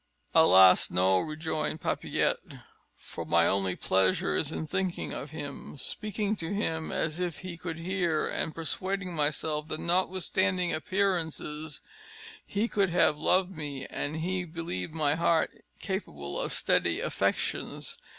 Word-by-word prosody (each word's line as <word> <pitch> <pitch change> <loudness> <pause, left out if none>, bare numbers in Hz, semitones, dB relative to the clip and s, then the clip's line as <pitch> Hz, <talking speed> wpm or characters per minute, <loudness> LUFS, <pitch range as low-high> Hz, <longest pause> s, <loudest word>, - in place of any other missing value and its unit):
"Alas, 95 - +7
no!" 95 +1 +3
rejoined 155 - -2
Papillette, - - 0 0.6
"for - - -7
my 85 0 +3
only 95 -1 +1
pleasure 95 0 +2
is 155 - 0
in 160 - -3
thinking 190 +2 -2
of 145 - -5
him, 145 -1 -7
speaking 210 +6 -1
to 165 -2 -4
him 160 -6 -1
as 160 +2 -1
if 175 -3 -2
he 185 -2 -6
could 165 -1 -5
hear, 170 -2 0
and 155 - -1
persuading 185 +3 -3
myself 150 0 0
that, 155 - -3
notwithstanding 185 +1 +1
appearances, 160 -4 -1 0.6
he 205 +3 -1
could 200 -4 +2
have 170 -3 +4
loved 185 +5 +2
me, 145 -4 -5
had 145 - -2
he 180 +3 -1
believed 165 - -5
my 150 -2 +2
heart 165 0 +2 0.3
capable 70 - -4
of - - -2
steady - - +2
affections. - - -2
160 Hz, 135 wpm, -29 LUFS, 150-185 Hz, 0.6 s, Alas